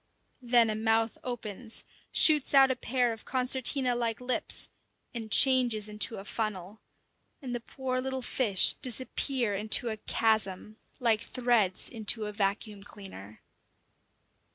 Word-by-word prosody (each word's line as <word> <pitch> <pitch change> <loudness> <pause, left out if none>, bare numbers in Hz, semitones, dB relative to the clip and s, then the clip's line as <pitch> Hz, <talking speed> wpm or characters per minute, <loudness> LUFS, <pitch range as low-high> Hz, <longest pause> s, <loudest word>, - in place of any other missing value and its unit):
Then 240 -2 +3
a - - -3
mouth 225 +1 -1
opens, 230 -2 -2 0.3
shoots 300 -3 +4
out 270 -1 +6
a - - -1
pair 245 -1 -1
of 225 - -12
concertina 255 0 0
like 235 -2 -3
lips, 250 0 -2 0.4
and 225 -2 -7
changes 245 -5 +4
into 210 +2 -2
a 195 - -10
funnel; 210 -2 -5 0.6
and 255 -4 -7
the 240 - -3
poor 255 +1 -5
little 265 0 -4
fish 215 -7 +4
disappear 255 -1 -2
into 215 +4 +2
a 220 - -5
chasm, 215 -2 -1 0.2
like 230 -3 +1
threads 235 -6 0
into 220 -1 0
a 210 - -6
vacuum 205 +1 -3
cleaner. 190 - -12
230 Hz, 130 wpm, -28 LUFS, 210-255 Hz, 0.6 s, out